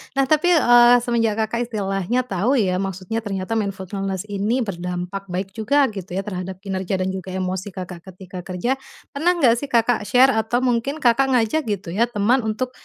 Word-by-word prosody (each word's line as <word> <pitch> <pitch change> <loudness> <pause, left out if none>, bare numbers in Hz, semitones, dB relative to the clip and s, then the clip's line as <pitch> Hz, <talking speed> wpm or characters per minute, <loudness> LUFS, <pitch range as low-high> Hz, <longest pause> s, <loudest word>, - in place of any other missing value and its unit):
nah 275 - +3
tapi, 310 +4 +4
eee, 240 -5 +6
semenjak 230 -3 +1
Kakak 235 +2 -2
istilahnya 195 +2 -1
tahu 220 +3 0
ya 185 -3 +1
maksudnya 195 +3 -3
ternyata 195 +2 -2
mindfulness 195 -2 -3
ini 205 +5 0
berdampak 180 0 -5
baik 185 +2 -3
juga 275 +6 +3
gitu 195 -4 -8
ya 195 - 0
terhadap 185 -2 -5
kinerja 190 -1 -3
dan 185 - 0
juga 190 -1 -6
emosi 185 +1 -3
Kakak 180 -2 -7
ketika 185 0 -9
kerja, 185 +7 -2 0.4
pernah 320 +5 +2
nggak 240 -7 +4
sih 285 - -5
Kakak 230 -3 +2
share 260 +2 +5
atau 220 +2 0
mungkin 255 +4 0
Kakak 250 +3 +4
ngajak 245 +6 +2
gitu 200 -4 -3
ya 230 +4 +3
teman 235 +4 +2
untuk, 250 +4 -2
210 Hz, 180 wpm, -21 LUFS, 190-240 Hz, 0.4 s, eee